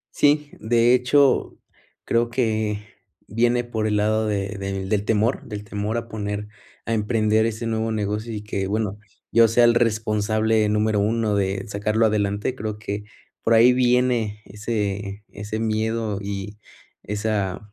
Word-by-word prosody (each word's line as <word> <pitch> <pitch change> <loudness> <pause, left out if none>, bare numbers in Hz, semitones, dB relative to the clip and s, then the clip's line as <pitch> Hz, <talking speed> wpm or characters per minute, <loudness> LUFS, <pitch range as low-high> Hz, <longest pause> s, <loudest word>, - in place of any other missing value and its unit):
Sí, 150 0 +3
de 115 +2 +3
hecho, 130 +2 +3 0.5
creo 115 0 +1
que 110 -4 0 0.5
viene 120 +3 +1
por 110 -2 -2
el 105 -1 +1
lado 110 +1 +1
de 100 0 -2
de 95 -1 -3
del 105 0 0
temor, 110 +3 +1
del 105 0 -7
temor 105 +2 -3
a 115 0 -4
poner, 105 -1 -4 0.4
a 115 - 0
emprender 110 0 +2
ese 115 +1 -3
nuevo 110 0 -1
negocio 105 +2 -2
y 105 -1 -5
que, 100 -2 -3
bueno, 105 0 -2 0.3
yo 115 0 +6
sea 120 +2 +4
el 120 0 +5
responsable 110 -1 +1
número 105 0 +1
uno 110 0 +1
de 95 0 -1
sacarlo 105 +2 +1
adelante. 105 +2 0
Creo 110 -4 -5
que 105 -1 -5 0.4
por 115 - +3
ahí 115 +3 +7
viene 125 -4 +1
ese 105 -1 -3
ese 105 +2 -6
miedo 110 -1 -1
y 100 +1 -5 0.4
esa 105 -1 -3
110 Hz, 150 wpm, -23 LUFS, 105-115 Hz, 0.5 s, ahí